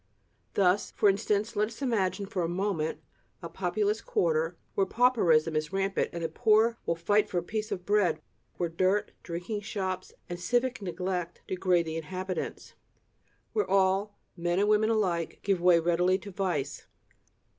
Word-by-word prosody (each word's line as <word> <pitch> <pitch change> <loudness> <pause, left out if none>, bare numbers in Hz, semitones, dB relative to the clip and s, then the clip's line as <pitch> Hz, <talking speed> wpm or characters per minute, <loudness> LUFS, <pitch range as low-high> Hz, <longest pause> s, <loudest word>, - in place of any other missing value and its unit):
Thus, 190 +1 +3
for 205 - +3
instance, 210 +3 0
let 210 +1 +2
us 225 - -11
imagine 200 -5 0
for 195 -2 -3
a 170 - 0
moment 175 -4 -1 0.4
a 170 - -5
populous 205 +5 -1
quarter, 165 0 0 0.2
where 195 - +1
pauperism 175 -10 +3
is 155 +1 -1
rampant 195 0 0
and 170 -1 -5
the - - +1
poor 225 +5 +3
will 170 - +2
fight 205 +5 +2
for 180 - -2
a 175 - 0
piece 215 +3 -4
of 180 -1 -4
bread; 205 -6 +2 0.4
where 175 - 0
dirt, 185 +5 +1
drinking 180 +5 -4
shops 190 -3 -4 0.2
and 175 0 -5
civic 245 +6 0
neglect 180 -1 -3
degrade 180 -2 +1
the 160 0 -4
inhabitants; 185 +3 -5 0.8
where 425 - 0
all, 195 +1 +2 0.2
men 175 0 -1
and 205 +2 +3
women 215 +1 +4
alike, 185 -7 0
give 195 -3 +1
way 175 -1 +6
readily 175 +2 +2
to 200 +1 -10
vice. 175 -8 -2
190 Hz, 160 wpm, -29 LUFS, 170-210 Hz, 0.8 s, way